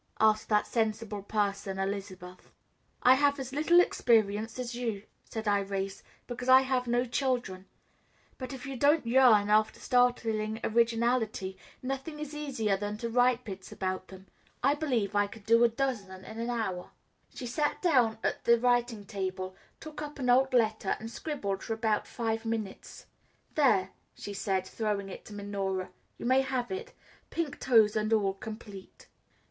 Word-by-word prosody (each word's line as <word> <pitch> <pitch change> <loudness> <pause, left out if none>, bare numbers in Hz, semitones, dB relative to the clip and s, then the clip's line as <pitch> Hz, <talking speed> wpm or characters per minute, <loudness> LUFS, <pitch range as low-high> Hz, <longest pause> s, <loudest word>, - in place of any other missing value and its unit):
asked 215 0 +3
that 210 -1 +3
sensible 220 -2 -1
person 200 -1 -2
Elizabeth. 190 -2 -5 0.5
"I 255 - +8
have 285 +1 +2
as 265 0 -6
little 315 +5 +5
experience 220 - +2
as 250 -1 -4
you," 230 -5 -3 0.2
said 220 0 -6
Irais, 195 -1 -1 0.2
"because 250 +1 -5
I 260 0 +9
have 260 -2 -1
no 240 +1 +2
children; 245 -7 -2 0.7
but 255 0 -5
if 265 -1 -7
you 275 -1 -5
don't 290 +3 +3
yearn 230 -4 +5
after 215 +1 +3
startling 225 -3 +1
originality, 230 -3 +1 0.3
nothing 270 +4 -4
is 300 -1 -6
easier 260 -9 -1
than 205 +1 -4
to 230 +1 -4
write 245 +1 +3
bits 195 -3 -8
about 185 0 -3
them. 190 0 -13 0.4
I 275 +2 +5
believe 250 -10 -1
I 205 0 +3
could 205 0 -13
do 230 +1 +5
a 240 - +6
dozen 220 -7 -3
in 220 +1 -8
an 235 +1 -2
hour." 215 -7 -3 0.5
She 250 - -6
sat 295 +5 -1
down 250 -10 +3
at - - -1
the 235 0 +5
writing 240 -3 +1
table, 185 -1 -4 0.2
took 310 -1 -8
up 295 0 -6
an 250 -3 +1
old 265 +2 +4
letter, 220 -5 +1
and 225 +1 -7
scribbled 205 -12 -3
for 225 - -3
about 220 -2 0
five 225 -1 -2
minutes. 225 -3 -5 0.5
"There," 200 -11 +3 0.2
she 205 - -7
said, 195 -2 -1
throwing 205 -2 -2
it - - -9
to 215 - -10
Minora, 195 -2 -3 0.3
"you - - -7
may 260 +2 +4
have 260 -2 -2
it 450 +6 -5 0.4
pink 330 -5 -3
toes 225 -5 +4
and 215 0 0
all 200 -3 +2
complete." 205 -1 -10
225 Hz, 165 wpm, -30 LUFS, 200-255 Hz, 0.7 s, I